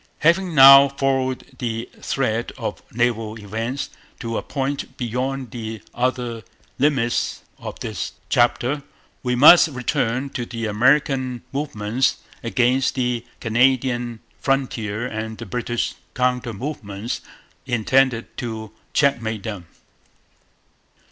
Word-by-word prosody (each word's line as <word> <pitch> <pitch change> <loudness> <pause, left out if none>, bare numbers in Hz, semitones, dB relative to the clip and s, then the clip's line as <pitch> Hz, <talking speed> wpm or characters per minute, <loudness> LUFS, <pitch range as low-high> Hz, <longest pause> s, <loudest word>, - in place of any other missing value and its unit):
Having 170 +2 +3
now 135 0 +10
followed 135 -1 0
the 115 -1 -3
thread 120 -3 -1
of - - -4
naval 115 -2 0
events 115 +6 -4 0.3
to 115 -1 -4
a - - 0
point 140 0 -3
beyond 130 +1 -3
the 110 -2 -6
other 120 -2 -1 0.4
limits 130 -4 +1 0.2
of - - -7
this - - -4
chapter, 125 +4 +2 0.4
we 125 -1 0
must 155 +7 +9
return 125 -1 -1
to 125 - -3
the 115 -1 -5
American 130 +2 +2
movements 130 -3 0 0.2
against 125 +3 +1
the 125 -2 0 0.2
Canadian 120 0 +1 0.2
frontier 120 -2 -1
and 110 -2 -4
the 115 - -7
British 120 0 -2 0.2
counter 125 -2 0
movements 110 -3 -5 0.5
intended 125 0 +2
to 110 -3 -5 0.2
checkmate 115 -7 +1
them. 100 -6 -6
125 Hz, 110 wpm, -22 LUFS, 115-135 Hz, 0.5 s, now